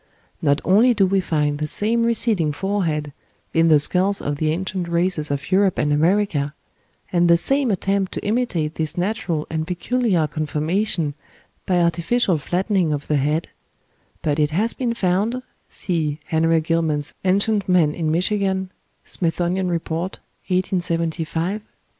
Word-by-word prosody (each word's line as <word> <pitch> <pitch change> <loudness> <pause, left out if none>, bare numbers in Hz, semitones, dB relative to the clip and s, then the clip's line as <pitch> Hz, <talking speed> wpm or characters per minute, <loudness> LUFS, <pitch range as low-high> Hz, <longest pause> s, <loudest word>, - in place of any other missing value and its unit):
Not 145 -1 +2
only 230 +6 +5
do 200 -2 +4
we 195 +1 +2
find 150 -4 0
the 150 - -2
same 230 +8 +1
receding 215 -9 +1
forehead 160 -6 -2 0.4
in 165 0 +4
the 155 -2 +6
skulls 190 +6 +3
of 145 0 -3
the 155 +1 0
ancient 185 +2 -2
races 170 -2 +1
of 140 +4 -4
Europe 190 -1 +3
and 150 0 +1
America, 155 -3 +1 0.6
and 175 0 +3
the 170 0 +6
same 270 +7 +1
attempt 195 -1 0
to - - -5
imitate 205 -9 0
this 155 0 -3
natural 175 -5 -1
and 160 0 -2
peculiar 185 -1 0
conformation 155 +2 -1 0.5
by 180 -2 +2
artificial 170 +2 +1
flattening 180 +1 0
of 145 -1 -3
the 150 - +1
head, 150 +4 0 0.7
but 150 0 0
it 150 -1 +3
has 205 +9 +2
been 240 -3 -2
found 205 +6 0 0.3
(see 155 -5 -2
Henry 165 0 +2
Gillman's 155 -2 -1
"Ancient 200 +2 +1
Man 170 -5 +4
in 160 -1 -2
Michigan," 190 +2 0 0.3
"Smithsonian 180 +2 -1
Report," 170 +1 -2 0.4
1875, 175 0 -1
p. - - -34
175 Hz, 145 wpm, -21 LUFS, 155-195 Hz, 0.7 s, the